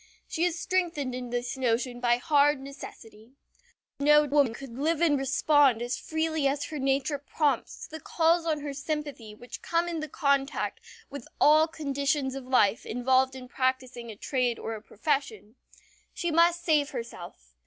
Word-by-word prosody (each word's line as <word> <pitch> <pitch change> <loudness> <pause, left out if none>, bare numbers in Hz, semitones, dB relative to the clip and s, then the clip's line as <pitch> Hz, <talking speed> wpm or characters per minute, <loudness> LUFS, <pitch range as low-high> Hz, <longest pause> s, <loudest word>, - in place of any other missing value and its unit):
She 335 +1 0
is 345 -1 -1
strengthened 340 -9 -1
in 250 -1 -5
this 245 +1 -3
notion 245 -1 -1
by 240 -1 +3
hard 290 +1 +3
necessity. 240 -4 -11 0.7
No 300 +1 +5
woman 285 -3 +3
could 250 +1 -9
live 315 +2 +1
and 330 -4 +3
respond 270 -1 +3
as 240 +1 -2
freely 315 -2 -1
as 280 +1 -1
her 305 - -5
nature 275 +2 0
prompts 285 -2 -1
to - - -17
the 315 - -6
calls 330 +2 +1
on 305 -2 0
her 290 -1 -5
sympathy 280 -6 -5
which 245 +3 -10
come 340 +1 0
in 335 -2 -3
the 310 0 -5
contact 280 0 0 0.3
with 280 -4 -8
all 310 +2 +6
conditions 280 -3 -1
of 265 -2 -7
life 230 -5 +3
involved 260 +2 +1
in 255 -1 -9
practicing 255 -2 -2
a 220 - -7
trade 245 +1 -1
or 225 - -5
a 215 - -7
profession. 220 -3 -3 0.6
She 345 - -2
must 340 +2 +3
save 300 -3 +3
herself. 175 - -8
275 Hz, 165 wpm, -28 LUFS, 245-305 Hz, 0.7 s, all